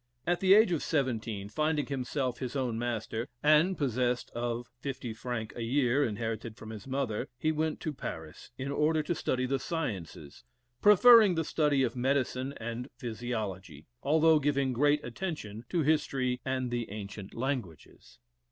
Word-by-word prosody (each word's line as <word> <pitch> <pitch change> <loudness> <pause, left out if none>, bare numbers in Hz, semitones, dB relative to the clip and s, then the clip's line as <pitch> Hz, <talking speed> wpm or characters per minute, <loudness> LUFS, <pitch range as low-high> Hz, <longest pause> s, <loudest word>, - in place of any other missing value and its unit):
At 175 0 +1
the 190 0 +6
age 215 -3 +5
of 165 - 0
seventeen, 115 -8 -1
finding 155 +3 0
himself 130 -2 -2
his 130 0 -4
own 125 -4 -1
master, 115 -1 -3 0.2
and 155 +5 +4
possessed 125 -3 0
of 120 0 -3
£50 120 -3 -4
a 120 - -5
year, 130 +3 +2
inherited 110 -1 -3
from 110 - -9
his 110 +3 -9
mother, 130 -5 -2
he 155 - +1
went 155 0 -1
to 155 - -3
Paris, 80 - -7
in 135 +1 -3
order 155 +2 +2
to 175 - -1
study 130 -5 -1
the 135 +1 0
sciences, 95 - -5 0.4
preferring 210 -1 +8
the 165 -1 0
study 145 -4 +2
of 120 -1 -1
medicine 130 +1 0
and 115 +3 -5
physiology, 105 - -5 0.2
although 155 +2 +4
giving 140 -2 +1
great 145 +4 +2
attention 120 - -5
to 170 -3 +1
history 135 -4 +1
and 130 -2 -2
the 120 -1 -2
ancient 100 -1 -7
languages. 120 - -5
130 Hz, 150 wpm, -30 LUFS, 115-150 Hz, 0.4 s, preferring